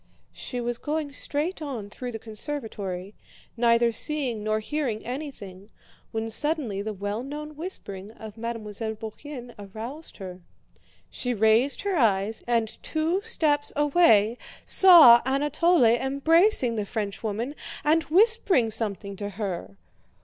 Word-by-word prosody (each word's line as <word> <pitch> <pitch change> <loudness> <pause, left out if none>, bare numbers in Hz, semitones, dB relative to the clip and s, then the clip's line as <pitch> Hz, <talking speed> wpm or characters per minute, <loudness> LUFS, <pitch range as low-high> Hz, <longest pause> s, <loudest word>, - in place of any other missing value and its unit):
She 250 - -6
was 240 0 -3
going 300 -1 -3
straight 305 +5 -3
on 255 -9 -5
through 250 +3 -6
the 225 - -5
conservatory, 215 -5 -6 0.4
neither 235 0 +3
seeing 255 -4 -1
nor 215 0 0
hearing 240 -2 -3
anything, 220 -8 -7 0.4
when 225 0 -3
suddenly 275 -7 +1
the 215 +2 -4
well 205 +2 -4
known 300 +3 -7
whispering 210 - -6
of 220 -2 -10
Mademoiselle 225 -1 -5
Bourienne 240 +3 -9
aroused 225 +10 -9
her. 185 -2 -9 0.7
She 245 -1 -2
raised 220 +6 +3
her 400 -3 0
eyes, 215 -3 +1
and 230 -2 -1
two 325 +5 -1
steps 310 -10 +1
away 275 -7 +4 0.3
saw 320 -11 +8
Anatole 295 +4 +2
embracing 270 - +3
the 210 - -2
Frenchwoman 220 +4 -3 0.3
and 315 +2 +3
whispering 375 - +3
something 200 -3 -3
to 205 0 -4
her. 185 - -5
235 Hz, 125 wpm, -26 LUFS, 215-295 Hz, 0.7 s, saw